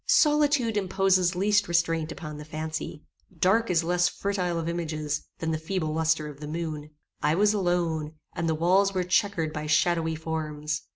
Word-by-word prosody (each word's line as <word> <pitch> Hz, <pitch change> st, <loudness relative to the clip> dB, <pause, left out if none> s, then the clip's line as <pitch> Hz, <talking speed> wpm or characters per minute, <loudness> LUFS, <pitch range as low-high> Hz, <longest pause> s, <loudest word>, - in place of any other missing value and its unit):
Solitude 290 Hz, -7 st, +3 dB
imposes 190 Hz, -2 st, +2 dB
least 205 Hz, +2 st, +2 dB
restraint 165 Hz, -2 st, +1 dB
upon 150 Hz, -3 st, -7 dB
the -, -, -7 dB
fancy. 155 Hz, 0 st, -5 dB, 0.3 s
Dark 200 Hz, +7 st, +3 dB
is 170 Hz, -2 st, +2 dB
less 175 Hz, +1 st, +2 dB
fertile 185 Hz, -4 st, -2 dB
of 165 Hz, 0 st, -3 dB
images 155 Hz, -3 st, -3 dB
than 160 Hz, 0 st, -2 dB
the 155 Hz, -, -1 dB
feeble 160 Hz, -1 st, -2 dB
lustre 160 Hz, -1 st, +1 dB
of 145 Hz, -2 st, -10 dB
the 150 Hz, -, -7 dB
moon. 155 Hz, -2 st, -4 dB, 0.3 s
I 150 Hz, -, +2 dB
was 210 Hz, +3 st, +4 dB
alone, 170 Hz, -5 st, 0 dB, 0.2 s
and 165 Hz, 0 st, -1 dB
the 160 Hz, -, +1 dB
walls 190 Hz, +4 st, +3 dB
were 185 Hz, -, +1 dB
chequered 180 Hz, -3 st, +1 dB
by 150 Hz, -1 st, -4 dB
shadowy 160 Hz, +1 st, +2 dB
forms. 155 Hz, -1 st, -3 dB
165 Hz, 170 wpm, -27 LUFS, 155-185 Hz, 0.3 s, was